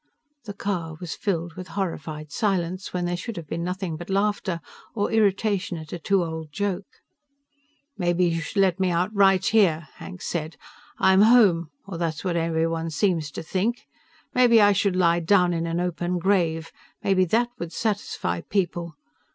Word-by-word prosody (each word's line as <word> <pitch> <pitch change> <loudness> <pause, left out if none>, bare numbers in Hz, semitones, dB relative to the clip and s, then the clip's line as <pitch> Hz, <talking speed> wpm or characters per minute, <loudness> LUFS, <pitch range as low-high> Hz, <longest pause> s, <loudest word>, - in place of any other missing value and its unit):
The 205 -2 -7
car 170 -6 -3
was 175 -3 -5
filled 175 -5 -2
with 185 +2 -8
horrified 155 -5 -4
silence 185 -1 -1
when 180 -1 -2
there 175 0 -1
should 210 +4 -6
have 170 - -6
been 170 +3 -3
nothing 180 -2 -3
but 175 +3 -9
laughter, 195 -3 0 0.4
or 205 -2 0
irritation 200 -4 +1
at 155 -1 -9
a 175 - -4
too 195 +3 +2
old 160 -2 -6
joke. 200 +2 -2 1.1
"Maybe 175 0 +2
you 165 -1 0
should 165 - -6
let 190 -2 +2
me 190 -1 +2
out 180 +4 0
right 195 -2 +4
here," 170 -8 +3
Hank 185 -1 -9
said. 160 -1 -3 0.4
"I'm 190 +1 +5
home 205 -8 +5 0.2
or 190 -4 -6
that's 165 -2 -2
what 180 -3 -1
everyone 165 0 0
seems 160 -1 0
to 150 - -7
think. 205 +8 -1 0.5
Maybe 245 -2 +6
I 205 -1 +6
should 200 -1 +1
lie 170 -2 +3
down 180 +1 +3
in 165 0 -1
an 165 +1 -1
open 180 0 -1
grave. 170 -3 +1 0.3
Maybe 190 -1 +3
that 235 +7 +1
would 170 -1 -5
satisfy 205 - -2
people. 175 -4 -2
180 Hz, 170 wpm, -25 LUFS, 165-200 Hz, 1.1 s, Maybe